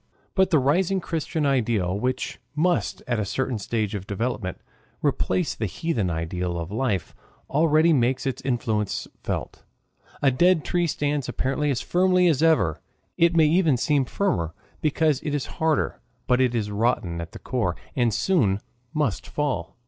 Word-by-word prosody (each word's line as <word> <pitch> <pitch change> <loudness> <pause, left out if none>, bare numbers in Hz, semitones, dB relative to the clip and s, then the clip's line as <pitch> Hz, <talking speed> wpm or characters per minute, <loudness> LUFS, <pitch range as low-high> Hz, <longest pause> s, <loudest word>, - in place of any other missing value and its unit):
But 190 -1 +3
the 165 - +4
rising 175 +8 +2
Christian 160 -2 -2
ideal, 115 -9 +1
which 125 +6 -2 0.2
must 175 +3 0
at 120 -3 -1
a - - +1
certain 120 +4 -2
stage 110 0 -2
of 100 -2 -5
development 105 -3 -3 0.4
replace 145 +1 +1
the 110 - -2
heathen 110 - -1
ideal 85 +1 -2
of 85 +2 -5
life, 105 -6 -1 0.4
already 155 +2 +4
makes 125 -1 +1
its 135 - -2
influence 110 -5 -1
felt. - - -4 0.6
A 140 - +4
dead 175 +4 +3
tree 175 -1 +1
stands 145 -3 -1
apparently 135 +4 -1
as 135 - 0
firmly 180 0 +3
as 155 -4 +2
ever 95 - +3 0.3
it 170 0 +3
may 160 -2 +6
even 160 -3 +3
seem 140 +2 +2
firmer 85 - -1 0.3
because 155 -2 +2
it 145 -1 -2
is 145 - -2 0.2
harder 160 -2 +1 0.2
but 125 +1 +3
it 125 -2 +2
is 105 -3 -1
rotten 100 -6 0
at 85 +1 -7
the - - -7
core, 100 -9 -1 0.2
and 120 -3 +2
soon 110 - +2 0.4
must 145 -10 -1
fall. 125 - -2
130 Hz, 160 wpm, -25 LUFS, 105-155 Hz, 0.6 s, may